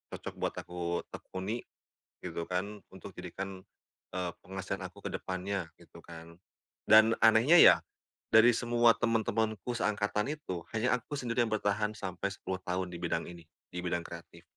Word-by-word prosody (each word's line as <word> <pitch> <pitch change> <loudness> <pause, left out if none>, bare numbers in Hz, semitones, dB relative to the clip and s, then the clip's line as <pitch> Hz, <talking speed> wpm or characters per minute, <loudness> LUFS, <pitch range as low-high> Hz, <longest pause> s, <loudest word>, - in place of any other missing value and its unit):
cocok - - -7
buat - - -1
aku 85 -1 -3
tekuni," 100 +6 -5 0.7
gitu 85 -1 -4
kan 100 +3 -2
"untuk - - -11
jadikan, 95 -1 -6 0.6
eee, 90 -1 -1
penghasilan 95 0 -5
aku 100 +2 -17
ke - - -1
depannya," 95 -1 -3
gitu 85 0 -16
kan. 85 0 -12 0.5
Dan 110 +1 +8
anehnya 115 +9 +6
ya - - +10 0.6
dari 110 +2 +8
semua 120 0 +4
teman-temanku 110 0 0
seangkatan 105 +3 0
itu, 95 - -6
hanya 125 +3 +2
aku 145 - -7
sendiri 120 -1 +1
yang 110 - -5
bertahan 105 +1 0
sampai 95 0 -3
10 95 -1 -5
tahun 90 +1 -1
di 85 - -6
bidang 85 -1 -1
ini, 85 -1 -11 0.3
di 90 - -6
bidang 85 -1 -1
kreatif. - - -11
100 Hz, 150 wpm, -31 LUFS, 90-110 Hz, 0.7 s, ya